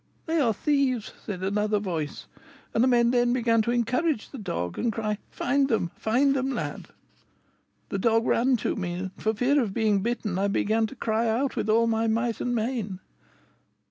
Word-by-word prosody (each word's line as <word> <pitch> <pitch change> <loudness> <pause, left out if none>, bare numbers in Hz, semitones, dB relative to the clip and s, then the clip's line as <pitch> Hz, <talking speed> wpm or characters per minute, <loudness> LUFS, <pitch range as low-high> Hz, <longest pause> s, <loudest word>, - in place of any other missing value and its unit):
'They 325 0 0
are 245 -6 +3
thieves,' 260 0 0
said 185 -4 -5
another 210 +2 +1
voice; 170 -7 -4 0.5
and 225 - +3
the - - +4
men 240 -2 +4
then 245 -1 +3
began 230 -2 +2
to 220 - -2
encourage 245 +3 0
the 275 - -8
dog, 170 - -4
and 235 - +1
cry, 215 -1 -2
'Find 275 +1 +1
'em! 180 -7 0
find 270 +5 +2
'em, 265 0 0
lad!' 260 - -4 1.0
The 195 - -2
dog 225 +2 +2
ran 250 +2 +3
to - - +1
me, 180 -3 -3
and, 185 +1 -4
for 220 0 -1
fear 270 +6 +3
of 205 -5 -3
being 215 -3 +2
bitten, 215 -4 -2
I 200 - +2
began 220 +2 +1
to 270 - -11
cry 225 -1 0
out 245 +5 0
with - - -2
all 230 +2 +4
my 225 0 +1
might 230 +1 0
and 245 0 -1
main. 220 -5 -2
225 Hz, 190 wpm, -26 LUFS, 210-245 Hz, 1.0 s, the